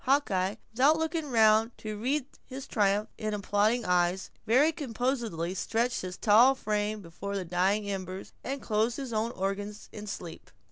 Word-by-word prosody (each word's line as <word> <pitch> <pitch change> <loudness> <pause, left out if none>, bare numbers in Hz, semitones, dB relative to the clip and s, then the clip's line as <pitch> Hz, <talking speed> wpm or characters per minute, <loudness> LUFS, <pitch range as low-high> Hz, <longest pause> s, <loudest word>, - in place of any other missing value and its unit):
Hawkeye, 210 -8 +2 0.2
without 275 +7 +4
looking 320 -1 -2
round 225 -1 +4
to 215 -1 -5
read 255 +6 -1 0.2
his 265 +1 -7
triumph 205 0 +1
in 215 -1 -2
applauding 210 +4 +1
eyes, 180 +1 +1 0.2
very 270 +8 +5
composedly 235 - -2
stretched 230 +5 -1
his 185 0 -6
tall 235 +5 +6
frame 210 -2 -2
before 190 +4 -6
the 190 -2 -2
dying 190 +4 +1
embers, 190 -1 -5
and 275 0 -4
closed 220 +2 +1
his 265 -4 -5
own 220 +1 0
organs 200 +2 -4
in 210 0 -8
sleep. 175 -5 -7
215 Hz, 155 wpm, -29 LUFS, 195-245 Hz, 0.2 s, tall